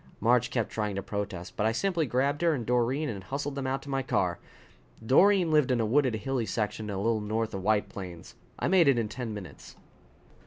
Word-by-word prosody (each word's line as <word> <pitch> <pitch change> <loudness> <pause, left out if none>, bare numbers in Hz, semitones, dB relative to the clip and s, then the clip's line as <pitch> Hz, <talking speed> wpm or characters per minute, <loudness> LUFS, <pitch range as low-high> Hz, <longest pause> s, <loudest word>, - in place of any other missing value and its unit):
Marge 120 +2 +3
kept 115 -4 -1
trying 105 -2 -2
to 100 - -3
protest, 100 -4 -5
but 105 - +1
I - - +2
simply 170 +4 0
grabbed 140 +5 0
her 170 -2 +3
and 120 -4 -4
Doreen 125 +5 +1
and 100 -7 -5
hustled 140 +7 -4
them 135 -1 -3
out 135 +1 -2
to 140 - -10
my 135 0 0
car. 90 -8 0 0.7
Doreen 180 - +5
lived 150 -4 +4
in 125 -2 +2
a 115 - +1
wooded, 130 +1 +2
hilly 120 +1 -2
section 105 +1 -2
a 100 - -3
little 110 +2 0
north 110 +1 -2
of 95 - -4
White 105 +1 +2
Plains. 90 -4 -9 0.2
I - - -1
made 180 -4 +5
it 135 -3 +5
in 115 -2 -1
ten 120 -1 -5
minutes. 105 -4 -9
115 Hz, 220 wpm, -28 LUFS, 105-135 Hz, 0.7 s, Doreen